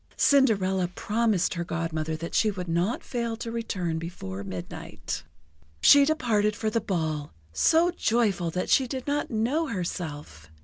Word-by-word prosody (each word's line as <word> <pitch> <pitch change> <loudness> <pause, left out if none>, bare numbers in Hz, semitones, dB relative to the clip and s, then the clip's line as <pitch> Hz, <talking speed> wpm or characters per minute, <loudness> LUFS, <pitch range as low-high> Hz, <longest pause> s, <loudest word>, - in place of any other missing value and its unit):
Cinderella 195 -10 +3
promised 210 +1 0
her 170 - -2
Godmother 160 -2 -2
that 165 +2 -6
she 220 -1 +3
would 185 -3 -5
not 170 +7 0
fail 235 -2 -3
to 230 0 -5
return 185 -8 -2
before 100 - -6
midnight. 90 -2 -6 0.6
She 285 - +7
departed 225 -9 +1
for 215 +1 -2
the 230 - +1
ball, 155 -6 -2 0.2
so 330 - +4
joyful 215 - +1
that 180 +2 -2
she 265 - +4
did 260 0 -5
not 290 0 -1
know 255 +9 0
herself. 150 - -5
195 Hz, 145 wpm, -27 LUFS, 165-235 Hz, 0.6 s, She